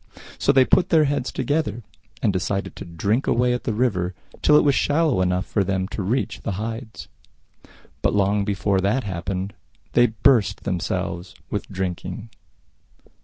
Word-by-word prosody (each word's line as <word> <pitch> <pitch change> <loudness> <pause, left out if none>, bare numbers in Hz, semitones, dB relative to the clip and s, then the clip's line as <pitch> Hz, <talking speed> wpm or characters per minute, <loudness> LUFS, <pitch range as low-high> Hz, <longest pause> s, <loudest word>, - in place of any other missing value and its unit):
So - - +4
they 135 -2 +5
put 180 - +3
their 160 -2 +5
heads 140 -3 -1
together, 145 -7 -1 0.4
and 105 -4 +3
decided 95 +1 -2
to - - -8
drink 100 - -1
away 125 +1 +2
at 125 - -4
the - - 0
river 95 -7 0 0.3
till 150 - +5
it - - +5
was 145 - +4
shallow 145 - +2
enough 90 +1 +1
for 100 - 0
them 95 0 -1
to 105 - -4
reach 110 +8 -1
the 110 - -3
Hides. 110 +3 -6 0.9
But - - +1
long 100 0 +2
before 100 -1 0
that 105 +7 +1
happened 95 +1 -3 0.4
they 120 0 +5
burst 110 -3 +2
themselves 90 -1 -3 0.2
with - - -3
drinking. 95 +4 -4
105 Hz, 160 wpm, -23 LUFS, 95-125 Hz, 0.9 s, they